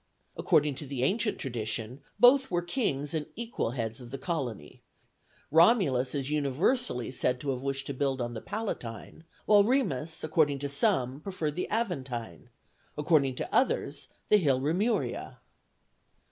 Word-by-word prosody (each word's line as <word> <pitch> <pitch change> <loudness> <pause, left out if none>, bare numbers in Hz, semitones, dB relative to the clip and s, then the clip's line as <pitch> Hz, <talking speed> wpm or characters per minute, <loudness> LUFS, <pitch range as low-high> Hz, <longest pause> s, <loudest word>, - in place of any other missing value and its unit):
According 150 -1 +2
to 145 - -7
the 130 -2 -3
ancient 210 - +1
tradition, 115 0 -4 0.2
both 260 +3 +6
were 175 -1 0
kings 170 - -1
and 155 -2 -2
the - - -27
equal 235 - -3
heads 115 +2 -3
of 120 - -10
the 135 - -5
colony; 130 - -4 0.7
Romulus 160 - +4
is 135 -2 -2
universally 145 - 0
said 125 -1 0
to 140 +2 -2
have 130 -1 -4
wished 135 0 -3
to 140 - -4
build 135 0 -1
on 120 -1 -3
the 110 - -6
Palatine, 165 - -6 0.2
while 205 -1 +6
Remus, 165 - 0
according 155 -2 +2
to 140 +1 -4
some, 135 -1 +1
preferred 165 -5 -3
the 180 - -3
Aventine; 130 - -3 0.5
according 150 -4 +2
to - - -5
others, 260 - +1 0.2
the 210 - +7
hill 140 -9 +2
Remuria. 180 - -1
145 Hz, 150 wpm, -29 LUFS, 130-180 Hz, 0.7 s, the